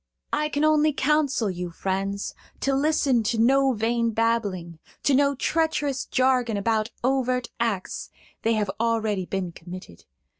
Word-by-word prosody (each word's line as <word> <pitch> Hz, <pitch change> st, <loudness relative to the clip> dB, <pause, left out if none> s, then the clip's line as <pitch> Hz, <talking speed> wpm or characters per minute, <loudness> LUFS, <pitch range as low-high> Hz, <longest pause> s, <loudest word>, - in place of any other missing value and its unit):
"I 300 Hz, 0 st, +1 dB
can 290 Hz, 0 st, -1 dB
only 310 Hz, 0 st, +4 dB
counsel 280 Hz, -7 st, +1 dB
you, 180 Hz, -1 st, -4 dB
friends, 195 Hz, +3 st, -3 dB, 0.3 s
to 275 Hz, -, +1 dB
listen 275 Hz, -3 st, +2 dB
to 225 Hz, +1 st, -1 dB
no 270 Hz, +3 st, +4 dB
vain 230 Hz, +1 st, +1 dB
babbling, 210 Hz, -7 st, -1 dB, 0.2 s
to 285 Hz, -, +3 dB
no 280 Hz, +1 st, +3 dB
treacherous 295 Hz, -2 st, 0 dB
jargon 255 Hz, -4 st, +2 dB
about 220 Hz, +1 st, 0 dB
overt 255 Hz, -1 st, +1 dB
acts; 220 Hz, -5 st, -2 dB, 0.3 s
they 230 Hz, -, +2 dB
have 210 Hz, -3 st, 0 dB
already 220 Hz, -5 st, 0 dB
been 190 Hz, -3 st, -3 dB
committed. 175 Hz, -, -11 dB
230 Hz, 140 wpm, -25 LUFS, 200-275 Hz, 0.3 s, only